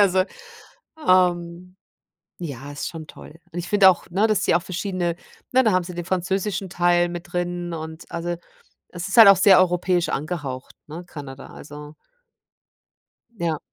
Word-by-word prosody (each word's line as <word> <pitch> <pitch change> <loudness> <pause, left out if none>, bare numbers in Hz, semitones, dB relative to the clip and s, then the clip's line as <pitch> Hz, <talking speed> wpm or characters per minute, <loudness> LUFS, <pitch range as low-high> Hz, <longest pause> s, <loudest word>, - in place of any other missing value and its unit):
Also, 190 -2 +4 0.8
ähm, 180 0 +2 0.6
ja, 145 -4 -7
ist 145 - -5
schon 160 -2 -9
toll. 155 - -13 0.2
Und 175 - -5
ich 175 - -5
finde 200 -2 +7
auch, 180 - -1
ne, 200 +5 +2
dass 210 -3 +1
die - - +3
auch 175 - +2
verschiedene 180 -2 -2 0.4
ne, 260 +1 +4
da 220 - +3
haben 185 -1 +2
sie 180 +1 -8
den 175 -1 -5
französischen 190 +1 -2
Teil 175 0 +2
mit 175 +1 -8
drin 175 -1 -3
und 160 0 -7
also 170 +1 -3 0.6
es 175 +2 -6
ist 195 - -2
halt 220 -3 +11
auch 195 - +8
sehr 190 0 +6
europäisch 180 -1 +1
angehaucht, 140 -4 -4
ne, 170 +4 -8
Kanada. 140 -5 -9
Also 150 +1 -11 1.4
Ja. 170 -7 -2
175 Hz, 160 wpm, -23 LUFS, 165-185 Hz, 1.4 s, halt